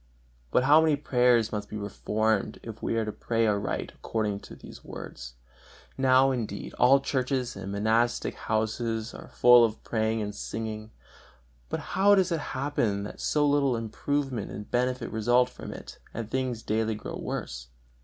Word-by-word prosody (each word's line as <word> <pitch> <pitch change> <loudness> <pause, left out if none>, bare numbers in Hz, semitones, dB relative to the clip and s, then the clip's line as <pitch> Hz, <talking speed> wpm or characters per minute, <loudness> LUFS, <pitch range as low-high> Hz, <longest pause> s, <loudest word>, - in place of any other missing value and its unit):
But 125 - +3
how 150 +4 +7
many 160 -2 +3
prayers 125 -5 +3
must 105 -1 -4
be 105 - -5
reformed, 105 +1 -1
if 115 -1 -8
we - - -1
are 110 - +1
to 110 - -3
pray 115 +1 0
aright 105 -2 -1
according 105 -3 -2
to - - -12
these - - -13
words! - - -9 0.6
Now, 130 0 +4
indeed, 110 -6 -4
all 135 +3 +6
churches 130 -2 -1
and 100 0 -6
monastic 110 +4 +1
houses 110 +1 -2
are - - -10
full 125 -1 +6
of 110 -1 -1
praying 110 -1 0
and 105 0 -4
singing, 110 +1 -5 0.8
but - - -2
how 200 +1 +5
does 190 -2 +2
it 165 - +1 0.2
happen 120 -8 0
that 105 - -8
so 150 -1 +2
little 140 -3 +2
improvement 125 +1 -2
and 105 - -8
benefit 125 -1 0
result 120 +3 +3
from - - -9
it, - - -10 0.2
and 115 -1 -5
things 130 -4 -2
daily 110 0 0
grow - - -6
worse? 60 0 -5
115 Hz, 165 wpm, -28 LUFS, 110-130 Hz, 0.8 s, how